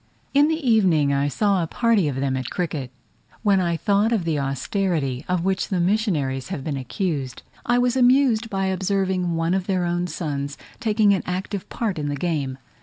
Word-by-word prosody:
In 285 +1 +5
the 315 -3 -1
evening 175 -11 +4
I 140 +1 +1
saw 195 - +1
a 165 - -1
party 225 -3 +2
of 140 - -2
them 135 0 -1
at 130 -2 -3
cricket: 155 -7 -3 0.5
when 200 -3 +4
I 170 -2 0
thought 205 +4 +2
of 220 -6 +1
the 160 -3 0
austerity 135 0 -1
of 180 -1 0
which 190 -1 0
the 185 - -1
missionaries 170 - 0
have 135 - -4
been 145 -1 -3
accused, 135 - -3 0.2
I 240 +1 +3
was 245 0 +2
amused 250 -3 +4
by 195 -2 -1
observing 190 -2 0
one 165 +1 0
of 190 -1 -1
their 185 -3 +1
own 175 +1 -1
sons 145 -5 -4 0.2
taking 215 -4 +3
an 190 - 0
active 185 +2 -4
part 210 -8 -2
in 145 -1 -2
the 145 - -2
game. 140 -4 -2
180 Hz, 190 wpm, -23 LUFS, 145-205 Hz, 0.5 s, In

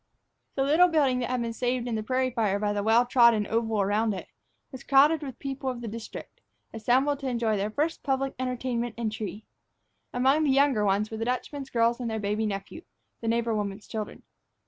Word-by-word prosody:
The 270 - +1
little 315 +6 +5
building, 285 -7 +2
that 245 - -2
had 250 -1 -1
been 230 0 -3
saved 245 +1 -1
in 240 - -2
the 220 - -1
prairie 255 +3 0
fire 215 -5 +1
by 205 0 -1
the 205 - -1
well 225 +3 +4
trodden 235 -4 +5
oval 225 -1 0
around 210 +2 +1
it, 185 - -8 0.4
was 260 -3 -9
crowded 290 +3 +5
with 270 -5 -6
the - - -24
people 270 -1 -3
of 245 -2 -5
the 235 - -5
district, 230 - -8 0.3
assembled 260 +6 +1
to 275 - -4
enjoy 235 -3 0
their 205 +1 -1
first 300 +9 -1
public 270 -1 -1
entertainment 250 -2 -2
and 230 -2 -2
tree. 215 0 -6 0.7
Among 265 +5 +3
the 295 - +2
younger 270 -5 +3
ones 205 +2 +1
were 220 - -4
the 225 - -2
Dutchman's 270 +2 -3
girls 235 +1 +2
and 240 -2 -3
their 220 - -2
baby 210 +1 -1
nephew, 200 +10 -5 0.4
the 230 - -5
neighbor 230 0 +1
woman's 205 -1 -3
children. 215 -1 -6
235 Hz, 210 wpm, -27 LUFS, 215-265 Hz, 0.7 s, little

